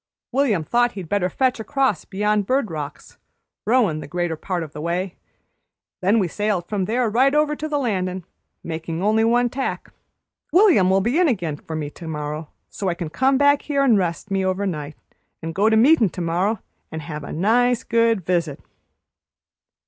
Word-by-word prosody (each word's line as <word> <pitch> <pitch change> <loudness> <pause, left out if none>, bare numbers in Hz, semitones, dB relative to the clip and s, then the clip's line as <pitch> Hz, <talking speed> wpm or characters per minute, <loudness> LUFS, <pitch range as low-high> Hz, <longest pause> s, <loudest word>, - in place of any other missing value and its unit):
William 245 - +1
thought 240 +7 +1
he'd 190 -4 -7
better 190 0 0
fetch 255 +3 0
across 265 - 0
beyond 210 0 0
Bird 255 -7 +1
Rocks, 150 -3 -7 0.5
rowin' 215 -10 +3
the - - -8
greater 175 +1 -2
part 175 +2 -3
o' - - -4
the 150 0 -9
way; 175 +3 -2 0.9
then 195 +5 +3
we 195 -5 +2
sailed 205 -1 -1
from 200 -2 -1
there 240 +4 0
right 260 +6 +3
over 300 0 +2
to 310 +1 -5
the 295 - 0
landin', 185 -8 -2 0.4
makin' 165 +1 -4
only 215 +2 +3
one 240 +2 +3
tack. 265 +3 -4 0.6
William'll 200 - +5
be 240 - +1
in 360 - +4
again 175 - -1
for 160 +2 -8
me 150 -2 -4
to 165 - -10
morrow, 150 0 -5 0.2
so 195 - -3
I 175 - -1
can 170 -3 -5
come 265 +9 +2
back 285 +1 +4
here 280 -2 0
an' 250 -5 +5
rest 180 0 -2
me 195 -1 +1
over 190 +2 0
night, 150 -5 -4 0.5
an' 165 - -3
go 200 +6 +2
to 220 - +3
meetin' 240 - +5
to 180 - -7
morrow, 185 +5 0 0.3
and 160 -1 -6
have 150 -3 -6
a - - -7
nice, 235 +7 +2
good 230 -5 +1
visit." 170 -5 -1
195 Hz, 185 wpm, -22 LUFS, 170-245 Hz, 0.9 s, William'll